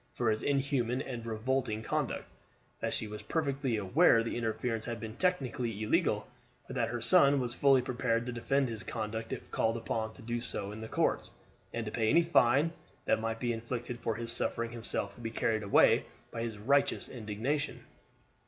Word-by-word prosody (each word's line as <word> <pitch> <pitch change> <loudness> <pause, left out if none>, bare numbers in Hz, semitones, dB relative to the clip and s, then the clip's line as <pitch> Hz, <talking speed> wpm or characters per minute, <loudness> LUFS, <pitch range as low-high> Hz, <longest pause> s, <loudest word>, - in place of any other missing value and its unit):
for 120 -2 +2
his 110 - -1
inhuman 135 -3 +1
and 120 -4 -5
revolting 115 0 -1
conduct; - - -1 0.5
that - - -1
she 110 - -1
was 105 0 -7
perfectly 140 -6 -1
aware 115 - +4
the 115 - -3
interference 115 0 -1
had 120 -1 -4
been 110 -1 -6
technically 125 - 0
illegal, 105 - +1 0.4
but - - -8
that - - +1
her - - -3
son 140 0 +6
was 120 -2 -1
fully 135 0 +4
prepared 120 -2 0
to 125 - -3
defend 135 +3 +1
his 115 -3 -5
conduct 110 0 -4
if - - -6
called 115 +1 +1
upon 110 -1 -2
to 125 - -13
do 120 +1 -2
so 100 -4 -3
in 110 +1 -8
the 110 - -5
courts, - - 0 0.4
and 115 -1 -3
to 105 - -4
pay 110 -1 +1
any 170 +8 +5
fine 140 +1 +4 0.3
that - - +2
might 115 0 -2
be 120 -1 0
inflicted 120 +1 -4
for 115 -2 -1
his 115 0 -1
suffering 115 0 0
himself 115 -3 -3
to 120 - -13
be 115 - -3
carried 110 -1 0
away 100 -1 +5 0.3
by 115 - -4
his 115 -2 -3
righteous 140 +7 +2
indignation. 120 +6 -3
115 Hz, 190 wpm, -32 LUFS, 110-130 Hz, 0.5 s, son